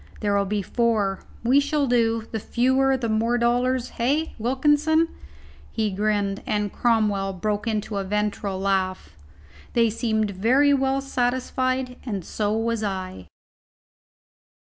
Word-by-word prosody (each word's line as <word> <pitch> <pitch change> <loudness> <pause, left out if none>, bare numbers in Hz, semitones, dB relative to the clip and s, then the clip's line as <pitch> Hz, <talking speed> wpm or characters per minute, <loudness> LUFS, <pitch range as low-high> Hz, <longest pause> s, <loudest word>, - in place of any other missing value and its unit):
"There'll 200 -1 +1
be 205 0 -1
four; 215 -4 0 0.2
we 255 +4 +5
shall 285 0 +1
do. 230 -3 +1
The 225 - -2
fewer 260 +4 +2
the 240 -2 -2
more 225 +2 +1
dollars, 245 +1 +1
hey, 285 +7 -1
Wilkinson?" 295 +7 +2 0.6
He 220 -2 -1
grinned, 205 0 0
and 210 -1 -1
Cromwell 210 -5 +1
broke 210 +4 -2
into 215 -1 -2
a 195 - -1
ventral 205 -1 -2
laugh. 190 -1 -1 0.6
They 230 -2 +3
seemed 220 -2 0
very 255 +9 +3
well 270 0 +1
satisfied, 255 0 -1
and 200 -8 -4
so 210 -1 -1
was 230 0 -1
I. 185 - -4
225 Hz, 125 wpm, -24 LUFS, 205-255 Hz, 0.6 s, we